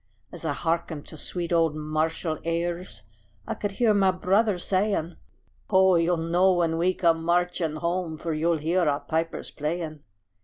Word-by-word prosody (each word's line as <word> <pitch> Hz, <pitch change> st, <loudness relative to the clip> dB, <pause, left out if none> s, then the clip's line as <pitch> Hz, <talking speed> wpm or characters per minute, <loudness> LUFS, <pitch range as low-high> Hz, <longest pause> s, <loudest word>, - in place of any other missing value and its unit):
As -, -, -6 dB
I 150 Hz, -, 0 dB
hearkened 165 Hz, -1 st, -2 dB
to -, -, -8 dB
sweet 175 Hz, +2 st, -3 dB
old 165 Hz, -2 st, +3 dB
martial 155 Hz, +1 st, -2 dB
airs 170 Hz, -7 st, -2 dB, 0.4 s
I -, -, -2 dB
could 205 Hz, -1 st, -4 dB
hear 225 Hz, +1 st, +3 dB
my 195 Hz, -2 st, +4 dB
brother 195 Hz, +2 st, +2 dB
saying: 185 Hz, -2 st, 0 dB, 0.5 s
"Ho! 190 Hz, -1 st, +5 dB
you'll 170 Hz, 0 st, +2 dB
know 175 Hz, +3 st, +3 dB
when 165 Hz, -2 st, +1 dB
we 180 Hz, +2 st, +2 dB
come 165 Hz, -2 st, +2 dB
marching 175 Hz, -2 st, 0 dB
home, 170 Hz, 0 st, -2 dB
For 165 Hz, +1 st, -3 dB
you'll 165 Hz, +2 st, +1 dB
hear 165 Hz, +4 st, 0 dB
our 145 Hz, 0 st, -1 dB
pipers 160 Hz, +3 st, -3 dB
playing." 155 Hz, 0 st, -3 dB
170 Hz, 160 wpm, -26 LUFS, 160-180 Hz, 0.5 s, Ho